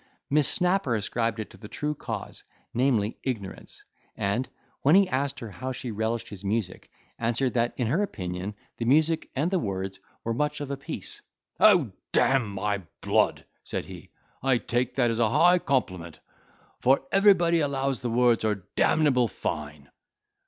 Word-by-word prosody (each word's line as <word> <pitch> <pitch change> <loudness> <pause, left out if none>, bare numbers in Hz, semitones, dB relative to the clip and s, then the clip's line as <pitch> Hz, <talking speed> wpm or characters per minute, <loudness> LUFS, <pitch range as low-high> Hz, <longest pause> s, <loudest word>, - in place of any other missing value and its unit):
Miss 150 -1 +4
Snapper 180 -8 +1
ascribed 115 +1 -1
it 110 - -5
to - - -14
the 105 - -10
true 150 +7 -3
cause, - - -6 0.3
namely 120 -4 +1
ignorance; 110 -8 -6 0.3
and, 110 +6 -1 0.3
when 145 +5 +5
he 195 0 +6
asked 140 0 -1
her 115 -3 -6
how 130 +6 -5
she 125 -1 -5
relished 110 +2 -2
his 100 -2 -9
music, 100 -2 -2 0.3
answered 120 +3 0
that, 120 0 +1
in 125 - 0
her 145 - +1
opinion, 95 - -4 0.2
the 115 - -3
music 155 +5 +3
and 150 +7 0
the 190 - +2
words 95 - -4 0.2
were 115 - -1
much 150 +4 -1
of 145 -1 -5
a - - -1
piece. 165 - -7 0.4
"Oh, 180 - +6 0.2
d—n 130 -4 +3
my 100 0 -2 0.2
blood!" - - +1 0.2
said - - -4
he - - -11 0.3
"I 130 -1 +3
take 120 +1 -1
that 120 -3 +3
as 115 - -2
a 115 -2 +3
high 175 +9 +5
compliment; 90 - -1 0.6
for 135 +2 +3
everybody 185 -4 +5
allows 135 -3 -1
the 125 - -2
words 120 -1 +3
are 105 -4 -1
d—able 140 -6 +3
fine." 75 -7 -5
125 Hz, 165 wpm, -27 LUFS, 105-145 Hz, 0.6 s, he